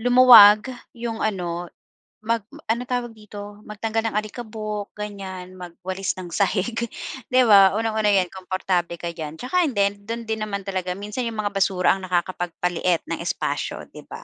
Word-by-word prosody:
lumuwag 240 -3 +8 0.3
'yong 230 -1 -4
ano, 175 -4 -2 0.6
mag 230 0 +1
m 300 - -12
ano 230 +2 +1
tawag 245 -2 -2
dito? 205 -1 -10
Magtanggal 220 +1 -2
ng 210 - -9
alikabok, 215 -1 -5
ganyan, 190 -3 -7
magwalis 185 +2 -4
ng 180 -2 -7
sahig. 225 +4 0 0.4
'Di 255 0 +5
ba? 195 -2 +7
Unang-una 220 -1 0
'yan, 185 -2 +2
komportable 185 -2 -2
ka 170 - -3
diyan. 155 -2 -6
Tsaka 350 +8 +1
hindi, 200 -6 +1
do'n 230 +3 -5
din 220 -1 -2
naman 200 -1 -4
talaga 185 -2 -2
minsan 210 +5 -4
'yong 225 -1 -5
mga 205 -1 -3
basura 190 -2 +3
ang 190 -1 -7
nakakapagpaliit 175 -1 -1
ng - - -3
espasyo, - - -3
'di - - -11
ba? - - -9
205 Hz, 160 wpm, -23 LUFS, 185-225 Hz, 0.6 s, lumuwag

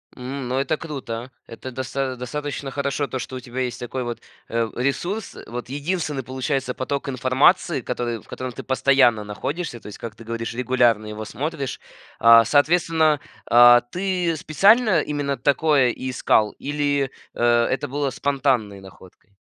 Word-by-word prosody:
Н 130 0 -5
ну 130 - -1
это 140 +3 0
круто. 130 -6 -6 0.2
Это 130 +3 -8
доста 130 +1 -3
достаточно 140 +2 -5
хорошо, 140 0 -1
то, 130 - -4
что 130 - -6
у - - -4
тебя 125 0 -7
есть 125 -1 -3
такой 125 +1 -4
вот, 120 -1 -5 0.3
э, 115 -1 0
ресурс. 175 - -2
Вот 120 +1 -6
единственный 145 -1 -2
получается 130 0 -2
поток 140 +2 -3
информации, 130 +4 +2
который 120 -1 -3
в - - -22
котором 130 0 -5
ты - - -8
постоянно 130 -4 +3
находишься, 130 - -4
то - - -13
есть 105 - -9
как 115 -2 -7
ты 115 - -12
говоришь 115 +1 -4
регулярно, 120 -3 +2
его 105 0 -6
смотришь. 140 +3 -4 0.4
А, 115 0 +8
соответственно, 155 +1 +3 0.3
а, 120 0 +7
ты 180 +4 -1
специально 195 - +4
именно 145 -2 -2
такое 140 0 +3
и 130 +2 -4
искал, 110 -4 +2
или, 145 -1 -1 0.2
э, - - -2 0.3
это 130 - -1
было 140 +1 -1
спонтанной 130 -8 0
находкой? 95 +1 -16
130 Hz, 155 wpm, -23 LUFS, 120-145 Hz, 0.4 s, А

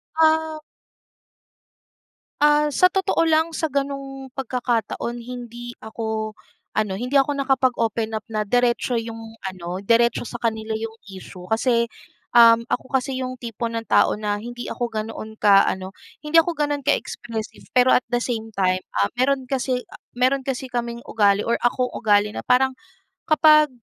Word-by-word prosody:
Ah 315 -1 +2 1.8
Ah, 295 0 +4
sa 365 - +3
totoo 365 -3 +2
lang 320 +1 +3
sa 320 0 -2
gano'ng 275 -1 -4
pagkakataon, 240 -2 -2
hindi 240 0 -8
ako 220 -1 -4 0.4
ano 205 -3 +1
hindi 250 +7 0
ako 275 +1 +3
nakapag-open 250 -5 0
up 215 - -2
na 215 -1 -2
diretso 245 +2 +1
'yong 225 -1 -5
ano 185 0 -5
diretso 235 +3 +3
sa 240 0 -6
kanila 220 -1 -2
'yong 225 0 -5 0.2
issue. 185 -1 -11
Kasi, 235 0 +2 0.5
um, 230 0 +8
ako - - -1
kasi 265 0 0
'yong 255 -1 -5
tipo 235 0 -4
ng 230 0 -2
tao 205 - +4
na 210 -1 -2
hindi 240 +3 -7
ako 245 - -2
ganoon 220 -1 -5
ka-ano 195 -2 +4 0.3
hindi 300 +2 +1
ako 335 +1 +4
ganoon 290 -3 -2
ka-expressive. 230 -5 -3
Pero 250 0 +5
at 250 - +4
the 240 - +2
same 225 -3 -3
time, 185 -2 0
ah, 100 0 +1
meron 260 0 +1
kasi 255 -2 -1
a - - -12 0.2
meron 260 +2 +1
kasi 265 -1 -3
kaming 235 -1 -3
ugali 205 -2 +3
or 235 - 0
akong 250 +1 +1
ugali 210 -2 +2
na - - -7
parang 260 +1 +3 0.5
kapag, 305 -1 +6
240 Hz, 150 wpm, -22 LUFS, 220-270 Hz, 1.8 s, um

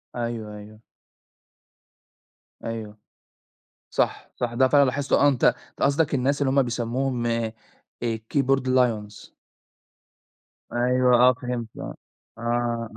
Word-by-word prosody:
أيوه، 115 -3 -4
أيوه. 105 +1 -12 1.9
أيوه. 110 -2 -5 0.9
صح، - - -1
صح، 120 -1 -2
ده 130 +2 +4
فعلًا 140 +1 +5
لاحظته، 140 +2 0
آه، 145 - +5
أنت 135 -4 +1
أنت - - 0
قصدك 145 +2 +2
الناس 140 +3 0
اللي 135 -1 +2
هم 140 - +4
بيسموهم 120 +1 -2
آآ 115 -1 -1 0.8
Keyboard 135 -1 +2
Lions. 115 -5 0 1.4
أيوه، 125 +1 +2 0.2
آه، - - +3
فهمت، 125 -2 -4
آه. - - -6 0.4
آه، 120 -1 -1
120 Hz, 110 wpm, -24 LUFS, 115-130 Hz, 1.9 s, فعلًا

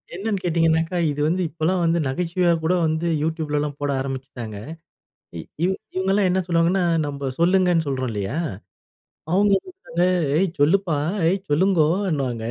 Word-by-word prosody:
என்னன்னு 200 +1 -2
கேட்டீங்கன்னாக்கா, 165 0 +1
இது 145 - -3
வந்து, 180 +4 0
இப்போலாம் 170 +4 0
வந்து, 165 +1 +2
நகைச்சுவையா 175 +5 0
கூட 165 +3 +2
வந்து 160 +2 0
YouTubeலலாம் 150 -2 -2
போட 145 0 -2
ஆரம்பிச்சுட்டாங்க. 130 -5 -6 0.8
இ - - -4 0.2
இவு 190 +1 +2 0.2
இவுங்க 190 +1 0
எல்லாம் 200 -2 +3
என்ன 190 - +2
சொல்லுவாங்கன்னா, 175 +2 +2 0.2
நம்ப 140 -2 -4
சொல்லுங்கன்னு 175 -2 +3
சொல்றோம் 130 -2 -2
இல்லையா, 105 +8 -3 1.0
அவுங்க 200 +2 +4 0.4
வந்து 175 +2 +2 0.3
ஏய் 185 -1 +1
ச்சொல்லுப்பா, 160 +1 +2 0.3
ஏய் 190 +3 +1
ச்சொல்லுங்கோன்னுவாங்க. 155 - +1
165 Hz, 135 wpm, -22 LUFS, 145-185 Hz, 1.0 s, அவுங்க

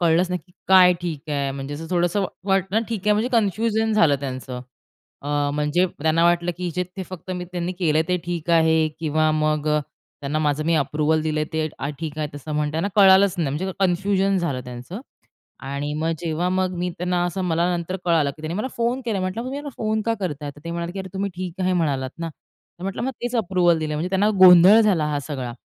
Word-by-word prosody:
कळलंच 170 +1 +3
नाही, 180 - -1
की 180 - -25 0.2
काय 185 -1 +7
ठीक 160 -3 -5
आहे, 140 -1 -1
म्हणजे 135 +1 -5
असं 165 +2 -7
थोडंसं 175 +3 +1 0.2
वाटतं 195 +3 +1
ठीक 225 -4 -3
आहे, 210 - +5
म्हणजे 215 +4 +1
कनफ्यूजन 220 +1 +1
झालं 165 -9 +4
त्यांचं. 130 -2 -5 0.6
अ, 145 - -6 0.3
म्हणजे 150 +5 +1 0.2
त्यांना 160 +1 +3
वाटलं, 175 0 +2
की 180 -1 -2
जे 180 - +1
ते 190 - -3
फक्त 185 0 -8
मी 180 -1 -3
त्यांनी 175 0 -2
केलंय, 160 -3 +2
ते 180 - +2
ठीक 170 -1 -3
आहे 160 -1 +4
किंवा 155 0 +1
मग 155 0 0
अ, 150 0 +2 0.4
त्यांना 145 +1 -2
माझं 150 0 0
मी 165 +1 +2
अप्रूव्हल 150 +2 +1
दिलंय 155 -1 0
ते 155 0 0 0.3
ठीक 155 -1 -5
आहे. 150 - -1
तसं 150 +2 -7
म्हणणं 150 +5 -1
कळालंच 195 -1 +6
नाही, 160 -4 +1
म्हणजे 185 +7 -3
कन्फ्युजन 195 +1 +2
झालं 145 -8 -2
त्यांचं 125 - -8 0.7
आणि 140 +2 -3
मग 160 +2 -1
जेव्हा 170 +1 -1
मग 185 0 0
मी 180 +1 -1
त्यांना 180 0 0
असं 175 +2 -3
मला 170 -1 +1
नंतर 175 +2 -4
कळालं, 165 -4 +3
की 155 - -16
त्यांनी 155 +1 -4
मला 215 - -1
फोन 240 +3 0
केला, 220 -4 -1
म्हंटलं, 185 +5 -3
"तुम्ही 265 +3 -4
मला 290 - -6
फोन 215 0 0
का 230 +2 0
करताय?" 150 -6 -4
तर 145 - -17
ते 170 - -5
म्हणाले, 170 0 -3
की 195 - -6
"अरे, 190 0 -6
तुम्ही 200 +1 -2
ठीक 180 -1 -5
आहे 185 0 +1
म्हणालात 140 -7 0
ना?" 165 0 -3
तर 170 +2 -19
म्हंटलं 195 +3 -3
"मग 265 - -1
तेच 245 +1 -2
अप्रूव्हल 180 -6 +2
दिलं." 155 -1 -2
म्हणजे 165 +4 -2
त्यांना 195 +2 +2
गोंधळ 185 +3 +9
झाला 190 -8 +2
हा 145 - 0
सगळा, 130 -5 -4
170 Hz, 215 wpm, -22 LUFS, 155-190 Hz, 0.7 s, गोंधळ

